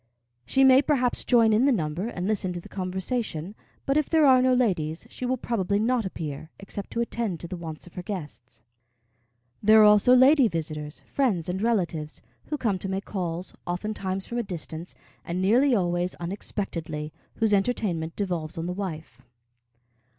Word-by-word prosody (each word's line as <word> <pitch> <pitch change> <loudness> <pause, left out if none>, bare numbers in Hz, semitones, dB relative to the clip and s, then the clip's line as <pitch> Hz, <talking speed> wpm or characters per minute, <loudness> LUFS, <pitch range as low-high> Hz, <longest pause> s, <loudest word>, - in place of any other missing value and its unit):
She 270 - +3
may, 265 0 +7
perhaps, 260 -4 0
join 230 -3 +4
in 225 +5 +4
the 280 - +4
number 170 -2 -1
and 185 -5 -4
listen 200 -4 0
to 175 - -4
the - - -12
conversation; 190 -1 -3 0.3
but 275 +1 +2
if 305 - +1
there 320 -2 +4
are 260 -2 +6
no 255 0 +3
ladies, 175 -11 0
she 250 - -4
will 255 +1 0
probably 200 -5 -1
not 230 0 +1
appear, 155 -4 -6
except 195 0 -6
to 235 - 0
attend 230 -7 -2
to 170 - -6
the 180 - -5
wants 160 -3 -7
of 175 - -15
her 180 - -5
guests. 150 - -8 1.0
There 215 +1 +6
are - - +8
also 210 +4 +6
lady 265 +1 +6
visitors 155 -4 -5
friends 220 - 0
and 185 +2 -2
relatives 175 -9 -1 0.3
who 300 - -3
come 215 -8 0
to 195 - -4
make 195 +1 -3
calls, 180 -2 -4
oftentimes 190 +1 -3
from 240 - -3
a - - 0
distance, 170 -3 -7 0.3
and 170 +2 -3
nearly 240 +8 +4
always 175 -2 0
unexpectedly, 170 -4 -4 0.2
whose 220 -2 +1
entertainment 195 -6 0
devolves 175 -4 -3
on 165 - -3
the 180 - -2
wife. 180 -5 -6
195 Hz, 175 wpm, -26 LUFS, 170-235 Hz, 1.0 s, are